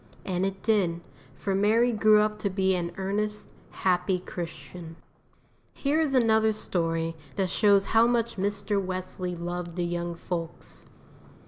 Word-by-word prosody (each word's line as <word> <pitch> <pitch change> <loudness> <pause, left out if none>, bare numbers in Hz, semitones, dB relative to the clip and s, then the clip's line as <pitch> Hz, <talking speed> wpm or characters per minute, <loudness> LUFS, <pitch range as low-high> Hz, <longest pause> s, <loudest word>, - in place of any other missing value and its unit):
And 185 0 0
it 195 0 -6
did, 190 -7 +2 0.4
for 195 - -2
Mary 220 +5 +3
grew 215 -1 +5
up 210 0 0
to 200 - -1
be 190 0 +1
an 175 -1 -1
earnest, 210 +2 -2 0.2
happy 180 0 +1
Christian. 170 -1 -8 0.8
Here 290 +3 +1
is 285 -4 +1
another 220 -3 +4
story 165 -5 -1 0.2
that 190 -2 0
shows 200 -2 +4
how 225 +2 +4
much 235 -1 +1
Mr. 200 +1 -1
Wesley 185 -1 -4
loved 175 0 -5
the 175 -1 -1
young 175 0 -3
folks. 170 -1 -5
190 Hz, 140 wpm, -27 LUFS, 175-215 Hz, 0.8 s, grew